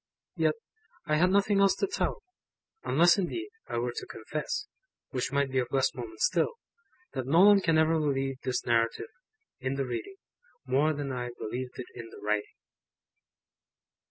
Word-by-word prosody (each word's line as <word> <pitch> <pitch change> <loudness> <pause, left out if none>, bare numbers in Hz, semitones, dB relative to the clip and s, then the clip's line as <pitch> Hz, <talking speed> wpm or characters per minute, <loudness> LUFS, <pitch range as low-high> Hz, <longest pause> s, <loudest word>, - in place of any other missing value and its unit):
Yet, - - +2 0.5
I 150 - +2
had 180 +3 +4
nothing 200 +1 +3
else 195 -1 +5
to - - 0
tell; 400 +3 -2 0.6
unless, 170 +6 +5
indeed, 340 - -2 0.2
I - - -3
were 120 +1 0
to - - -4
confess 150 - -4 0.5
(which 125 -3 -2
might 140 -1 +1
be 130 - +2
of 125 - 0
less 135 -1 +2
moment 110 -3 -8
still), 175 - +2 0.6
that 130 -1 -3
no 165 +6 +5
one 205 0 +7
can 165 -3 +3
ever 160 +1 +3
believe 135 -3 0
this 130 - -2
Narrative, 115 - +1 0.5
in 130 +1 -2
the 135 0 -1
reading, 125 - -5 0.5
more 140 +4 +3
than 145 -2 -4
I 125 -1 -3
believed 125 +3 -5
it 125 - -5
in 115 -1 -8
the - - -12
writing. 105 0 -2
140 Hz, 165 wpm, -29 LUFS, 125-175 Hz, 0.6 s, one